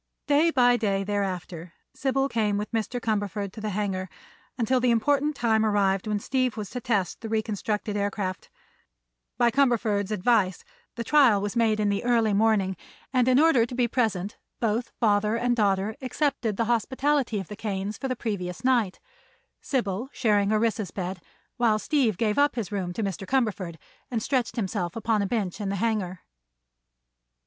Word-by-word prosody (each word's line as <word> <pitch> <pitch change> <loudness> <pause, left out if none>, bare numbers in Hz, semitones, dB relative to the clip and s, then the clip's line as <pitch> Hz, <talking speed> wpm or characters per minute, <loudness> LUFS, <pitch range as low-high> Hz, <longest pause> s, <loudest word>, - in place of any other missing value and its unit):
Day 300 +3 +4
by 245 -5 +4
day, 195 -4 0
thereafter, 185 -4 -3 0.2
Sybil 270 0 0
came 215 -5 0
with 210 +1 -4
Mr. 230 +2 -2
Cumberford 205 -3 -2
to 220 - -8
the 215 - -2
hangar, 190 -2 -2 0.5
until 250 +2 +2
the 250 0 +2
important 285 +6 +2
time 225 -3 +2
arrived 200 -2 +1
when 210 -1 0
Steve 255 +2 -1
was 205 -2 -5
to 250 - -5
test 205 -7 -1
the 225 - -5
reconstructed 215 -1 -2
aircraft. 200 -2 -3 0.9
By 240 -1 +4
Cumberford's 225 -7 +2
advice 205 -3 +1 0.3
the 235 - -3
trial 255 -6 +5
was 205 +2 -3
made 225 -2 +2
in 210 -1 +2
the 200 +2 -1
early 230 -3 +2
morning, 200 -3 +2 0.4
and 250 -1 +3
in 255 +1 +5
order 310 -7 +5
to 245 +2 -4
be 245 -1 +2
present 215 -5 -1 0.2
both 230 +1 -1
father 210 -1 +2
and 240 +1 +1
daughter 205 -1 +1
accepted 255 -5 -1
the 230 - +1
hospitality 250 +1 +1
of 190 - -6
the 210 - -7
Kanes 205 -1 -4
for 270 - -2
the 255 - -1
previous 195 -6 -4
night, 240 -7 +2 0.6
Sybil 240 -2 -2
sharing 205 -4 +2
Orissa's 215 -2 +1
bed 185 -1 -5 0.4
while 230 -3 +3
Steve 235 - +1
gave 215 +3 +1
up 290 0 +3
his 225 -7 -3
room 190 -3 -2
to 220 - -3
Mr. 195 -1 -4
Cumberford 210 -10 0 0.3
and 230 -3 -2
stretched 255 -5 0
himself 185 -5 -2
upon 225 -2 0
a 200 - 0
bench 205 -3 -2
in 200 - -2
the 200 - -1
hangar. 195 -4 -1
215 Hz, 170 wpm, -26 LUFS, 200-240 Hz, 0.9 s, trial